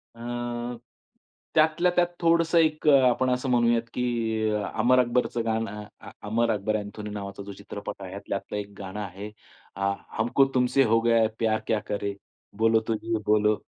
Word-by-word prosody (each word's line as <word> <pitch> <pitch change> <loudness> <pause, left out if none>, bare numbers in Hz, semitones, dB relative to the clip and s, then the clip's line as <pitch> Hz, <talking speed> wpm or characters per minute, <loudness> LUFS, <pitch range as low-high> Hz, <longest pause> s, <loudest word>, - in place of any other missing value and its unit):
अ, 120 0 -4 0.8
त्यातल्या-त्यात 175 +3 +3
थोडंसं 170 0 +3
एक 155 -1 +2
अ, - - +8 0.2
आपण 130 +1 +1
असं 125 +1 -1
म्हणूयात 120 -1 +3
की 125 - -2 0.7
अमर 125 +3 +4
अकबरचं 120 -1 +1
गाणं 110 -2 -2 0.2
अ, - - -11 0.2
"अमर 115 +2 +1
अकबर 105 +1 -1
अँथोनी" 105 0 -7
नावाचा 100 -1 -6
जो 100 0 -8
चित्रपट 100 0 -8
आहे 95 +1 -7
त्यातलं 100 +1 -3
एक 105 0 -5
गाणं 95 +1 -7
आहे, 100 +1 -6 0.5
अ, 100 +1 0 0.3
"हमको 120 +5 +3
तुमसे 125 +2 +3
हो 115 - +5
गया 115 0 +3
है 110 - +4
प्यार 110 -1 +1
क्या 110 - +1
करे, 100 0 -2 0.4
बोलो 115 0 +4
तो 115 - +1
जिये 115 +1 -2
बोलो 105 0 +3
115 Hz, 160 wpm, -26 LUFS, 105-125 Hz, 0.8 s, अ